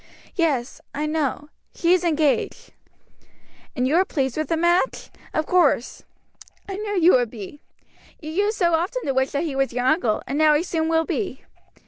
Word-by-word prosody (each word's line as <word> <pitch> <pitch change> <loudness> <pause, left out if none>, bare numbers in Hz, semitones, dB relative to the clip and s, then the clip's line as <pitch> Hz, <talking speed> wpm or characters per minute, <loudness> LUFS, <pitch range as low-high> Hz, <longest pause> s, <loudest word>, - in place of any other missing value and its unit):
"Yet; 280 -8 -1 0.2
I 295 +2 -1
know; 300 -1 -2 0.3
she 340 +1 +3
is 365 -1 +2
engaged." 310 -4 0 1.0
"And 250 0 +1
you 305 +5 +2
are 370 - +5
pleased 270 -9 -2
with 310 0 -2
the 330 - +1
match, 345 +7 +1 0.2
of 310 - -1
course; 315 -9 +1 0.6
I 390 -1 -5
knew 410 -2 -2
you 345 +2 +6
would 245 -3 +3
be. 225 +5 -10 0.6
You 310 -1 -7
used 410 +5 0
so 345 -3 +2
often 360 +10 0
to 275 - -1
wish 265 0 +1
that 285 +2 -2
he 305 -5 -3
was 270 -2 0
your 245 0 -1
uncle, 250 -7 +1
and 280 +3 -3
now 305 -1 +5
he 300 - +1
soon 325 -2 -1
will 325 0 +2
be. 370 - -3
310 Hz, 185 wpm, -23 LUFS, 270-345 Hz, 1.0 s, you